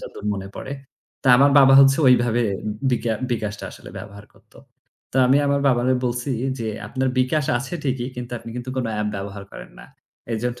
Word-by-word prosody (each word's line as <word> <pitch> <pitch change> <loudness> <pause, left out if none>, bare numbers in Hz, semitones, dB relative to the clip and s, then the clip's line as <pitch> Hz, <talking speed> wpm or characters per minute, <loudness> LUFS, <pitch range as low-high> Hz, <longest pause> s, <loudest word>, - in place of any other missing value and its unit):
যতদূর - - -10
মনে 95 0 -6
পড়ে। 135 - -6 0.5
তা 130 - +1
আমার 140 +2 +5
বাবা 135 -1 +7
হচ্ছে 135 +2 +5
ওইভাবে 120 -1 +3 0.5
বিকা 120 -2 0 0.2
বিকাশটা 105 -3 -3
আসলে - - -12
ব্যবহার 100 0 -11
করতো। - - -22 0.5
তা 130 - 0
আমি 135 - +5
আমার 140 0 +1
বাবারে 125 0 +2
বলছি 120 +2 -2 0.3
যে, 115 - -4 0.2
"আপনার 130 0 -1
বিকাশ 140 +4 +1
আছে 135 +7 -6
ঠিকই, 130 -2 -1
কিন্তু 125 0 -7
আপনি 115 - -10
কিন্তু 125 +1 -5
কোনো 125 -3 -1
app 105 - -1
ব্যবহার 100 0 -7
করেন - - -10
না। - - -12 0.5
এজন্য 120 +2 -3
125 Hz, 180 wpm, -22 LUFS, 115-135 Hz, 0.5 s, বাবা